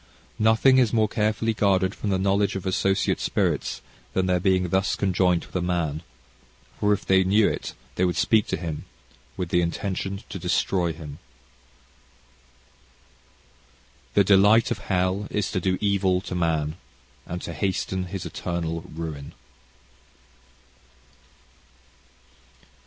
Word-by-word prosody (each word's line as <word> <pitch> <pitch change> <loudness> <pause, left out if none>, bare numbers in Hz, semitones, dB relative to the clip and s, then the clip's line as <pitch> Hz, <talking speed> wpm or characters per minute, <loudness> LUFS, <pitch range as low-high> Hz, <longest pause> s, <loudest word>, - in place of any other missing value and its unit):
"Nothing 110 +4 +5
is 120 -5 +3
more 110 -2 +3
carefully 110 +1 0
guarded 95 -2 +2
from 105 - -4
the 95 - +2
knowledge 100 +1 +1
of 95 - -5
associate 95 +1 +1
spirits - - -1 0.3
than 95 - +1
their 90 -1 +2
being 90 0 +2
thus 95 +3 +1
conjoint 90 -3 +1
with - - -19
a 90 - +1
man, 85 -4 -1 0.8
for 105 - +2
if 105 - 0
they 95 0 +4
knew 100 +3 +4
it - - -4 0.2
they 90 - 0
would 90 -1 +1
speak 110 -2 +3
to - - -1
him, 80 -3 -5 0.5
with 90 -3 -3
the 90 - +3
intention 95 +3 -3
to 95 - -6
destroy 90 0 0
him."... 75 -2 -9 3.0
"The 100 - +6
delight 105 +4 +5
of - - -1
hell 95 +2 -1
is 105 -2 -1
to - - 0
do 95 +1 +1
evil 100 -3 +2
to - - -7
man, 80 -2 0 0.5
and 90 - -4
to 85 - -5
hasten 95 +1 -2
his 95 0 -6
eternal 85 -1 -3
ruin." 75 -3 -6
95 Hz, 135 wpm, -25 LUFS, 85-100 Hz, 3.0 s, The